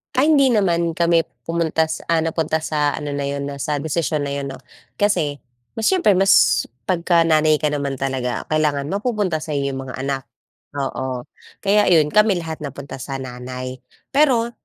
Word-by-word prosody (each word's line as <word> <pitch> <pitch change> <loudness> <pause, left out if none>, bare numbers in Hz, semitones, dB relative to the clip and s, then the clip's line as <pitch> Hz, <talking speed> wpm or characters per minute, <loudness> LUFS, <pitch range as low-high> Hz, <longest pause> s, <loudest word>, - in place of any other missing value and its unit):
Ay, 290 +5 +4
hindi 275 -3 +5
naman 170 -5 +1
kami 170 -1 +3 0.2
pumunta 165 -1 0
sa - - -4
ah, 165 -1 +2
napunta 160 -1 -1
sa 150 -2 0
ano 150 -1 -5
na 140 0 -2
'yon 140 0 -3
na 140 - -6
sa 150 +2 -1
desisyon 155 -1 -1
na 140 - -3
yun, 140 0 -3
'no? 130 - -10 0.4
Kasi, 150 -9 0 0.4
mas 225 - 0
siyempre 345 - +3
mas 155 -11 +5 0.2
'pagka 170 -2 +2
nanay 155 -1 +4
ka 150 - +1
naman 140 -2 -2
talaga, 130 -2 -2
kailangan 150 -2 0
mapupunta 200 -5 -1
sa'yo 140 -3 -2
yung 135 - -5
mga 130 0 -8
anak. 135 -1 -2 0.5
Oo, 130 -2 -3 0.4
kaya 205 +1 +3
ayun, 155 -4 +4
kami 210 -2 +4
lahat 160 -1 -6
napunta 140 -2 -7
sa 135 +1 -5
nanay. 130 0 -6 0.3
Pero, 255 -5 +3
155 Hz, 170 wpm, -21 LUFS, 140-175 Hz, 0.5 s, hindi